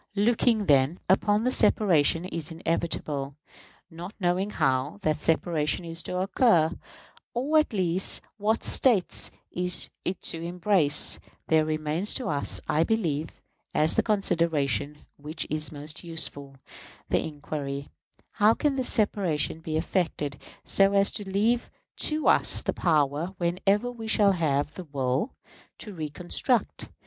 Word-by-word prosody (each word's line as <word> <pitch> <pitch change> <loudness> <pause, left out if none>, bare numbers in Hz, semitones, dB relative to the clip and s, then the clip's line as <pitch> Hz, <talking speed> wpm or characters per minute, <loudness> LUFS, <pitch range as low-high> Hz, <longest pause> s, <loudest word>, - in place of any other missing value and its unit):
Looking, 220 +1 +2
then, 140 +3 +3
upon 210 +5 +2
separation 170 - +3
as 165 -1 -2
inevitable, 160 -4 -3 0.6
not 175 +5 -8
knowing 185 +2 0
how 130 - 0
that 155 -1 +1
separation 160 0 0
is 165 0 -5
to 180 - -4
occur, 185 -4 +3 0.6
or 290 +6 +3
at 305 - 0
least 185 -3 0
what 220 +2 0
States 225 -9 +2 0.2
it 180 - -4
is 180 -1 -2 0.3
to 165 - -4
embrace, 175 -3 +1 0.3
there 160 -1 +4
remains 155 +5 -1
to 255 - -3
us, 145 -2 -1
I 155 - +2
believe, 165 -7 -2 0.3
as 155 +1 +3
the - - +4
consideration 160 - 0
which 150 +3 -4
is 155 0 0
most 150 +2 -7
useful, 145 -4 -4 0.5
the - - +2
inquiry, 145 -2 -5 0.4
How 215 +1 +4
can 290 -3 0
this 260 - +1
separation 190 - 0
be 160 -1 -3
effected 160 -4 -2 0.3
so 195 0 +3
as 200 0 +3
to 205 -2 -6
leave 225 +5 +1 0.4
to 305 0 -1
us - - +4
the - - -1
power, 155 +2 0
whenever 195 +7 +1
we 225 -2 -8
shall 210 -2 +4
have 150 -5 0
the 185 - -8
will, 140 - -2 0.4
to 210 - -8
reconstruct? 175 - -1
170 Hz, 135 wpm, -27 LUFS, 150-205 Hz, 0.6 s, there